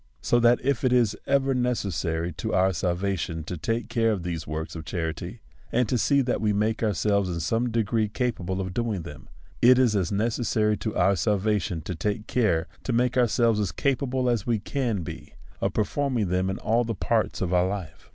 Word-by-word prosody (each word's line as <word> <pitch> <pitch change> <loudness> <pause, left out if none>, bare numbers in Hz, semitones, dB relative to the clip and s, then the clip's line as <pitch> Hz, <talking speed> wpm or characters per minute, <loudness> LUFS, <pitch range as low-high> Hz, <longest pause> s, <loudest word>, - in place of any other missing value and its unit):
So 120 - +2
that 120 +1 +5
if 135 -2 0
it 130 - +3
is 120 -4 +3
ever 135 -1 +2
necessary 95 -9 -1
to - - -3
our 95 +1 +3
salva 90 +4 -1
tion 80 -1 -4
to 90 - -5
take 115 +9 -2
care 115 -1 +1
of 95 -5 -2
these 85 -3 -4
works 80 +2 -4
of 80 - -6
charity, 80 -2 -4 0.3
and 125 0 +2
to 125 - 0
see 140 +4 +3
that 125 - -1
we 105 -1 +2
make 105 +2 0
ourselves 100 -2 +1
in 85 -1 -3
some 115 +8 0
degree 110 -1 +1
capable 100 -6 -2
of 95 -1 -3
doing 110 -5 -2
them, 75 -3 -11 0.3
it 125 +1 +7
is 125 -4 +3
as 95 -4 0
necessary 110 0 +1
to 110 - -4
our 95 +3 +3
salvation 105 -5 0
to 90 - -5
take 105 +6 -2
care 100 -11 +1 0.2
to - - -2
make 125 +1 +1
ourselves 115 -2 +3
as 100 -6 0
capable 130 - 0
as 120 -4 0
we 115 -2 +2
can 115 -3 -2
be 80 -2 -9 0.2
of - - -1
performing 120 -1 0
them 90 +1 +1
in 95 - -2
all 115 +3 +1
the 115 -1 -3
parts 110 +2 0
of 90 -1 -1
our 90 0 +3
life. 95 -5 -6
105 Hz, 205 wpm, -26 LUFS, 90-120 Hz, 0.3 s, it